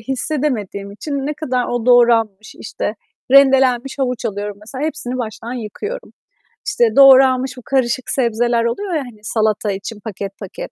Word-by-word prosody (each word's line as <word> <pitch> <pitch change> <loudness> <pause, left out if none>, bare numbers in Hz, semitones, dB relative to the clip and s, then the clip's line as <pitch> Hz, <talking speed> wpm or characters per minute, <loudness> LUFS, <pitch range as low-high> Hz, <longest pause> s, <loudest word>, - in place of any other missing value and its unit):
hissedemediğim 250 -6 -3
için 280 +5 -4
ne 300 - -2
kadar 255 -5 -2
o 240 -1 -3
doğranmış, 230 -4 +3
işte, 210 - -5 0.4
rendelenmiş 270 -1 +4
havuç 250 -2 -2
alıyorum 205 -2 -4
mesela, 260 +7 -6
hepsini 270 -5 -3
baştan 230 0 -5
yıkıyorum. 415 - -6 0.5
İşte, 240 - +1
doğranmış 265 -1 +6
bu - - -9
karışık 255 -2 0
sebzeler 235 -1 +1
oluyor 370 +11 -2
ya, 310 - 0
hani, 245 -5 -11
salata 215 -1 0
için 200 +3 -6
paket, 200 -2 -7
paket, 195 -3 -8
245 Hz, 145 wpm, -18 LUFS, 215-270 Hz, 0.5 s, doğranmış